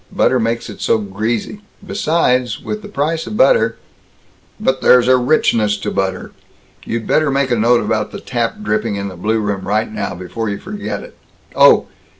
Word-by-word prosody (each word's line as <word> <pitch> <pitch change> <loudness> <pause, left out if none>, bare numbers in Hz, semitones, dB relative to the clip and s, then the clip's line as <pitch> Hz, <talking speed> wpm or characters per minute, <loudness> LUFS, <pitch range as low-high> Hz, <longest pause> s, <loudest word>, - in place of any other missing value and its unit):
Butter 130 - +2
makes 115 0 -1
it - - -10
so - - +2
greasy 110 - -3 0.2
besides, 130 -9 0
with 215 0 -5
the 210 - -9
price 160 -3 -2
of 215 - -5
butter 485 - +3 0.4
" - - -35
"But 130 -11 0
there's 125 -1 +5
a 130 - +6
richness 115 -5 +2
to 100 - -4
butter 95 -1 -2 0.5
You'd 115 0 -4
better 155 -2 +2
make 135 -1 0
a - - +3
note 120 +2 +3
about 110 -1 -1
the - - -7
tap 120 -2 -2
dripping 105 0 -1
in 100 0 -4
the 95 - -10
blue 110 +6 0
room 100 -3 -3
right 110 +2 0
now, 100 - -4
before 105 +5 -4
you 100 - -3
forget 205 +2 -6
it. - - -13 0.4
Oh! - - +6
115 Hz, 185 wpm, -17 LUFS, 105-135 Hz, 0.5 s, a